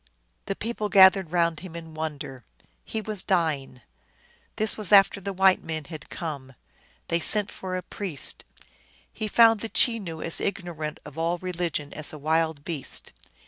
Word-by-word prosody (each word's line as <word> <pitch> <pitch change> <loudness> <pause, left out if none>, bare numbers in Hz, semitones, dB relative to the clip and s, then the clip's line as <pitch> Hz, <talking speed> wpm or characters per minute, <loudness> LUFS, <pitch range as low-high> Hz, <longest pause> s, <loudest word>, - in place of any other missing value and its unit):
The 195 - -2
people 215 -1 -3
gathered 190 -2 +6
round 170 -3 +1
him 175 0 -10
in 165 -1 -9
wonder. 150 -5 -6 0.4
He 220 - -4
was 215 -2 -3
dying. 155 -9 -1 0.7
This 215 0 +2
was 215 -3 -3
after 200 0 +6
the 200 +1 -4
white 190 0 +3
men 160 -1 -4
had 155 -1 -9
come. 140 -6 -6 0.6
They 170 - +1
sent 205 +5 +5
for 185 -1 -5
a 180 - -5
priest. 185 -8 -3 0.7
He 220 - -4
found 225 0 +5
the 225 - -5
Chenoo 200 -11 +1
as 165 - +2
ignorant 170 -6 -4
of 150 - -9
all 170 +2 0
religion 175 -5 -3
as 155 0 0
a 155 - -8
wild 160 0 0
beast. 155 -6 -3
170 Hz, 160 wpm, -26 LUFS, 155-195 Hz, 0.7 s, gathered